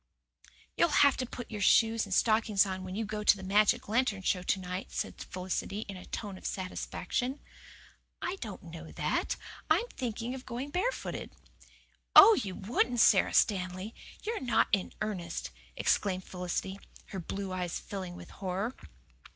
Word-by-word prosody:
"You'll 340 Hz, -4 st, +4 dB
have 280 Hz, -, +5 dB
to 255 Hz, -, -2 dB
put 245 Hz, -1 st, -8 dB
your 210 Hz, -2 st, -4 dB
shoes 225 Hz, +2 st, +4 dB
and -, -, -11 dB
stockings 215 Hz, -3 st, +4 dB
on 190 Hz, -1 st, -4 dB
when 185 Hz, 0 st, -6 dB
you 220 Hz, +1 st, -1 dB
go 210 Hz, 0 st, -4 dB
to 205 Hz, -, +6 dB
the 190 Hz, -, -9 dB
magic 205 Hz, +2 st, +3 dB
lantern 215 Hz, -3 st, +1 dB
show 180 Hz, 0 st, +1 dB
to 185 Hz, +2 st, 0 dB
night," 180 Hz, +1 st, -5 dB
said -, -, -3 dB
Felicity 185 Hz, +3 st, -3 dB
in 200 Hz, -3 st, -7 dB
a 185 Hz, -, -10 dB
tone 200 Hz, -4 st, -5 dB
of -, -, -16 dB
satisfaction. 245 Hz, +7 st, -3 dB, 0.8 s
"I 360 Hz, +2 st, -3 dB
don't 215 Hz, -, -7 dB
know 165 Hz, -1 st, -9 dB
that. -, -, 0 dB, 0.3 s
I'm 340 Hz, +9 st, +4 dB
thinking 240 Hz, 0 st, -4 dB
of 260 Hz, -1 st, -7 dB
going 255 Hz, +4 st, -4 dB
barefooted." 405 Hz, +10 st, -2 dB, 0.9 s
"Oh, 445 Hz, +3 st, +11 dB
you 200 Hz, -, -2 dB
wouldn't! 240 Hz, +4 st, 0 dB
Sara 200 Hz, -3 st, +5 dB
Stanley, 185 Hz, +1 st, +1 dB, 0.3 s
you're 450 Hz, +1 st, -2 dB
not 245 Hz, -3 st, +2 dB
in 195 Hz, -2 st, +1 dB
earnest!" 185 Hz, -6 st, -3 dB, 0.2 s
exclaimed 185 Hz, -2 st, +1 dB
Felicity, 180 Hz, +2 st, -4 dB, 0.3 s
her 195 Hz, -, -5 dB
blue 195 Hz, +2 st, -4 dB
eyes 180 Hz, -2 st, -2 dB
filling 185 Hz, -3 st, -6 dB
with -, -, -11 dB
horror. 195 Hz, +5 st, -3 dB
205 Hz, 160 wpm, -31 LUFS, 185-235 Hz, 0.9 s, Oh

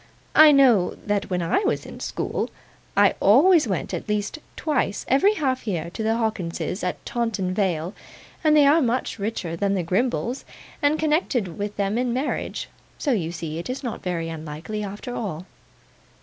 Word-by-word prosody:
'I 310 Hz, -1 st, +8 dB
know 245 Hz, -10 st, +5 dB
that 205 Hz, -1 st, -1 dB
when 180 Hz, -2 st, -1 dB
I 165 Hz, -, +2 dB
was 420 Hz, +1 st, -1 dB
at -, -, -10 dB
school, -, -, -2 dB, 0.5 s
I -, -, +6 dB
always 300 Hz, -, +6 dB
went 190 Hz, -5 st, -2 dB
at -, -, -4 dB
least 210 Hz, +8 st, -1 dB, 0.2 s
twice 290 Hz, -10 st, -1 dB
every 390 Hz, +11 st, +4 dB
half 260 Hz, -, -1 dB
year 170 Hz, -4 st, -2 dB
to 220 Hz, -, -5 dB
the 220 Hz, +1 st, +1 dB
Hawkinses 205 Hz, -4 st, -2 dB
at 180 Hz, -, -3 dB
Taunton 220 Hz, -6 st, -1 dB
Vale, 180 Hz, -3 st, -1 dB, 0.5 s
and 305 Hz, -1 st, +5 dB
they 290 Hz, -, +7 dB
are 300 Hz, +4 st, +5 dB
much 245 Hz, -3 st, -1 dB
richer 195 Hz, -5 st, -3 dB
than 200 Hz, +3 st, 0 dB
the 185 Hz, -, 0 dB
Grimbles, 240 Hz, +7 st, -1 dB, 0.4 s
and 290 Hz, +1 st, +3 dB
connected 300 Hz, -, 0 dB
with 205 Hz, 0 st, -4 dB
them 200 Hz, +3 st, 0 dB
in 250 Hz, -1 st, 0 dB
marriage; 265 Hz, +4 st, -2 dB, 0.3 s
so 290 Hz, -, 0 dB
you 175 Hz, -9 st, 0 dB
see 165 Hz, -2 st, -5 dB
it's 255 Hz, +11 st, -5 dB
not 240 Hz, -, -4 dB
so -, -, -23 dB
very 165 Hz, -2 st, -2 dB
unlikely, 160 Hz, +6 st, -5 dB
after 205 Hz, +5 st, -6 dB
all. 185 Hz, -8 st, -4 dB
210 Hz, 175 wpm, -24 LUFS, 180-260 Hz, 0.5 s, I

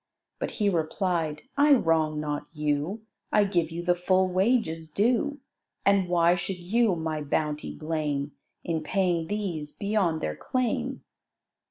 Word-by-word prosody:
But -, -, -2 dB
he 210 Hz, -, +2 dB
replied, 165 Hz, -3 st, 0 dB
"I 290 Hz, +1 st, +6 dB
wrong 160 Hz, -, +2 dB
not 150 Hz, -1 st, -3 dB
you; 150 Hz, +7 st, -1 dB, 0.3 s
I 210 Hz, -, +5 dB
give 175 Hz, -5 st, +1 dB
you 170 Hz, +1 st, -5 dB
the 175 Hz, 0 st, +3 dB
full 185 Hz, +1 st, +2 dB
wages 185 Hz, -4 st, +1 dB
due; 240 Hz, -, +1 dB, 0.4 s
And 200 Hz, -2 st, +4 dB
why 170 Hz, -1 st, +4 dB
should 180 Hz, +1 st, -3 dB
you 200 Hz, +3 st, +2 dB
my 160 Hz, -2 st, -2 dB
bounty 150 Hz, +1 st, -2 dB
blame, 150 Hz, -3 st, -2 dB, 0.3 s
In 165 Hz, -2 st, -1 dB
paying 175 Hz, 0 st, 0 dB
these 175 Hz, -7 st, -3 dB
beyond 200 Hz, -6 st, 0 dB
their 75 Hz, -, -2 dB
claim?" 255 Hz, -3 st, -2 dB
175 Hz, 140 wpm, -27 LUFS, 155-200 Hz, 0.4 s, I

